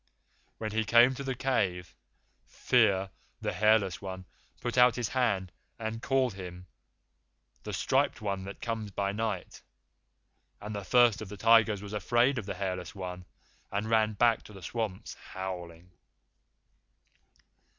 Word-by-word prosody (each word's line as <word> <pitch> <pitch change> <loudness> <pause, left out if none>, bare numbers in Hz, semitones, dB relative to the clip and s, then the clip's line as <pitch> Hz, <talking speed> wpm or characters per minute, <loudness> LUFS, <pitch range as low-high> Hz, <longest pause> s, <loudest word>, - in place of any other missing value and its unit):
When 110 -1 -4
he 110 +1 +1
came 120 +3 +6
to 140 - -6
the 135 -1 -2
cave, 95 -10 -1 0.5
Fear, 95 0 +2 0.3
the - - -2
Hairless 105 -4 +3
One, 95 -1 -6 0.3
put 120 0 -3
out 125 -2 +6
his 120 -3 -2
hand 100 -8 0 0.3
and 115 0 -4
called 130 -3 +1
him 90 -1 -8 1.0
'The - - -6
Striped - - +1
One 100 -3 -3
that 100 - -9
comes 115 -3 -3
by 100 0 -1
night,' 105 -3 -4 1.0
and 105 +1 -6
the 100 - -4
First 120 -1 +4
of 105 - -7
the 105 - -8
Tigers 115 -2 +4
was 100 0 -8
afraid 120 +6 +2
of 105 - -8
the - - -3
Hairless 90 -2 -4
One, 90 -1 -6 0.5
and 105 +3 -2
ran 110 -1 +3
back 115 +2 +3
to 105 - -12
the 95 -2 -12
swamps 110 +1 -4
howling." 90 -2 -7
105 Hz, 145 wpm, -30 LUFS, 95-115 Hz, 1.0 s, came